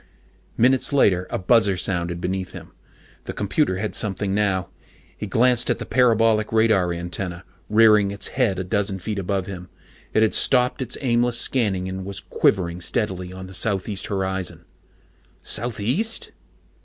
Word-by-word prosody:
Minutes 130 +2 +3
later, 90 -9 +3
a - - -2
buzzer 100 0 +3
sounded 85 -2 -1
beneath 95 +1 -3
him. - - -10 0.5
The - - -5
computer 100 +1 0
had 105 +2 -3
something 100 -1 -1
now. 100 -4 0 0.5
He - - -6
glanced 125 0 +3
at - - +1
the - - -6
parabolic 115 -3 +3
radar 110 -5 +3
antenna, 85 +1 -5 0.3
rearing 105 -2 +5
its 100 0 -3
head 120 -8 0
a 95 - -2
dozen 100 +1 -1
feet 100 +2 -4
above 95 0 -2
him. 90 -2 -8 0.4
It 110 - +3
had 110 - +2
stopped 125 0 +2
its 125 -2 -3
aimless 120 -2 +1
scanning 100 -9 0
and 95 0 -5
was 100 +1 -5
quivering 85 -1 0
steadily 90 0 -2
on 95 0 -8
the 95 - -11
southeast 100 0 -2
horizon. 95 -2 -3 0.8
_Southeast? 125 - -1
100 Hz, 150 wpm, -22 LUFS, 95-115 Hz, 0.8 s, rearing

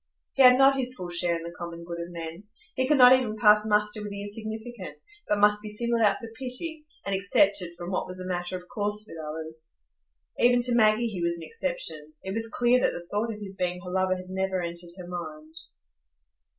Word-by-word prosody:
He 275 - +2
had 250 -1 +8
not 270 0 +5
his 255 0 0
full 180 -4 -6
share 175 0 +1
in 165 - -5
the 170 0 -7
common 170 -1 -7
good 170 0 -6
of 170 - -6
men; 170 +2 -7 0.3
he 260 0 0
could 300 0 +4
not 250 -1 +9
even 245 -4 +1
pass 210 0 +5
muster 210 0 +2
with 210 - -5
the 200 0 -6
insignificant, 220 0 -6 0.3
but 210 - +2
must 210 0 +4
be 215 - -7
singled 235 +2 0
out 205 -3 +4
for 230 - -8
pity, 300 +5 -3 0.2
and 200 - -2
excepted 195 -2 +2
from 175 +1 -6
what 185 - -1
was 185 0 -8
a 185 - -6
matter 180 0 -3
of 180 0 -13
course 210 -1 -3
with 165 - -10
others. 160 +1 -7 0.7
Even 245 0 +4
to 245 0 +3
Maggie 220 0 +4
he 205 -6 -3
was 170 0 0
an 165 - -8
exception; 160 - -4
it 190 - -4
was 225 +1 -1
clear 245 +1 +3
that - - +3
the 175 - -7
thought 215 +3 -1
of 210 -1 -8
his 195 -1 -7
being 180 -1 -2
her 180 0 -7
lover 185 0 +1
had 185 0 -9
never 190 0 -1
entered 170 0 -5
her 180 - -8
mind. 155 -3 -7
200 Hz, 225 wpm, -27 LUFS, 175-230 Hz, 0.7 s, not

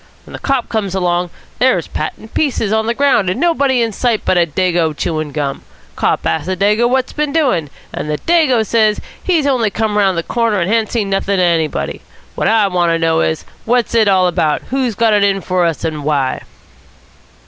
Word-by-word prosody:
When - - -13
the - - -7
cop 270 -3 -1
comes 200 -4 -2
along, 175 -1 0 0.3
there's 245 -10 +2
Pat 155 - -3
in 220 - -13
pieces 235 -8 -1
on 220 0 +1
the 235 - 0
ground 270 -9 +2
and 185 - -2
nobody 280 -7 +2
in 225 - -1
sight 230 +1 -1
but - - +2
a 175 -1 +3
Dago 170 -2 0
chewing 155 -3 -2
gum. 140 -2 -3 0.3
Cop - - 0
asks 160 0 -1
the 185 0 -2
Dago 210 +4 +2
what's 260 0 0
been 300 -1 -1
doing, 255 - +1 0.2
and 150 - -4
the 150 - -1
Dago 295 - +2
says 215 -1 +2 0.2
he's 335 -6 +1
only 250 -6 +2
just - - -25
come 215 -1 0
round 190 -3 +2
the 170 - -1
corner 230 -1 0
and 175 +3 -1
ha'n't 225 -2 +1
seen 210 -4 -1
nothing 195 +1 0
of 185 - +1
anybody. 165 -3 -1 0.3
What - - -1
I 220 -2 +3
want 175 -2 +1
to - - +1
know 165 0 +1
is, 160 - -1 0.2
what's 240 0 +1
it 225 -2 +3
all 190 -2 +4
about? 155 -3 0
Who's 255 -4 -1
got 225 +1 +2
it 205 -1 +3
in 195 -1 +2
for 180 -2 0
us 165 -2 -2
and 155 -2 -3
why?" 140 -3 0
200 Hz, 215 wpm, -16 LUFS, 170-235 Hz, 0.3 s, all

